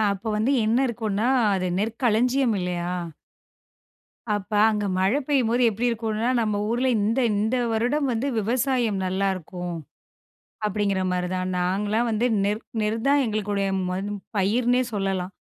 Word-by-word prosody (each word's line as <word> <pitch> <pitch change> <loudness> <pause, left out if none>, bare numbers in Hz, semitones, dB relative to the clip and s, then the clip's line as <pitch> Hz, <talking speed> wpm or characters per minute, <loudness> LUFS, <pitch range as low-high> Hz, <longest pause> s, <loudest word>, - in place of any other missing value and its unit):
அப்ப 200 +3 -8
வந்து 220 +5 +1
என்ன 225 +3 +2
இருக்குன்னா, 220 -1 -1 0.3
அது 185 -1 -1
நெற்களஞ்சியம் 235 +3 +1
இல்லையா? 175 -1 -2 1.4
அப்ப 205 +1 -5 0.2
அங்க 210 -1 0
மழை 195 +9 +2
பெய்யும்போது 250 -4 +2
எப்டி 220 +3 -4
இருக்கும்னா, 225 0 -1
நம்ம 210 -2 0
ஊர்ல 240 +3 0
இந்த 220 +5 +1
இந்த 215 +4 0 0.2
வருடம் 250 +6 +1
வந்து 235 +4 -1
விவசாயம் 235 -1 0
நல்லாருக்கும். 185 -2 -2 0.9
அப்டிங்கிற 200 -2 0
மாரிதான் 185 +1 -2
நாங்களாம் 205 +6 0
வந்து 220 +2 +1 0.2
நெற் 210 +2 0 0.2
நெற் 215 +1 0
தான் 285 +1 +4
எங்களுக்குடைய 205 -2 -1 0.2
ம 185 +1 -2 0.4
பயிர்ன்னே 240 +6 +2
சொல்லலாம். 195 -2 -2
215 Hz, 125 wpm, -24 LUFS, 195-235 Hz, 1.4 s, தான்